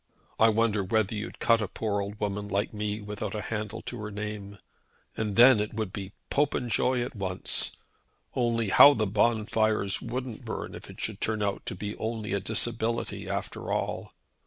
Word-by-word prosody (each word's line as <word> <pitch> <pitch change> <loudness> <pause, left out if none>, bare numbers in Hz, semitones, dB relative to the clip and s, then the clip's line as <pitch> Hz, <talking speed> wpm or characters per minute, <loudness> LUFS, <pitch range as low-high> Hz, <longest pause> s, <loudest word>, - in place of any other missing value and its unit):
I 110 - +7
wonder 110 -2 +2
whether 110 +2 +1
you'd 105 0 -5
cut 115 -1 +3
a 105 - -1
poor 100 0 -2
old 100 +1 -6
woman 105 0 -2
like 100 +1 -1
me, 105 0 -2
without 105 0 -5
a 105 - -2
handle 110 0 -4
to 120 - -6
her 105 - -4
name. 105 -1 -6 0.6
And 105 -2 -2
then 120 -1 +8
it 105 0 -2
would 110 -4 -3
be 100 0 -6 0.2
Popenjoy 125 -3 +1
at 120 - -6
once! 95 -3 +1 0.6
Only 115 -4 +1
how 145 +8 +9
the 110 - +1
bonfires 110 -1 +2
wouldn't 125 -3 -5
burn - - -5
if - - -10
it - - -11
should - - -3
turn 110 -1 0
out 100 -1 -2
to - - -3
be 105 +3 -5
only 110 -2 -3
a 100 - +1
disability 115 +3 -1
after - - -4
all. - - -2
105 Hz, 180 wpm, -28 LUFS, 100-115 Hz, 0.6 s, how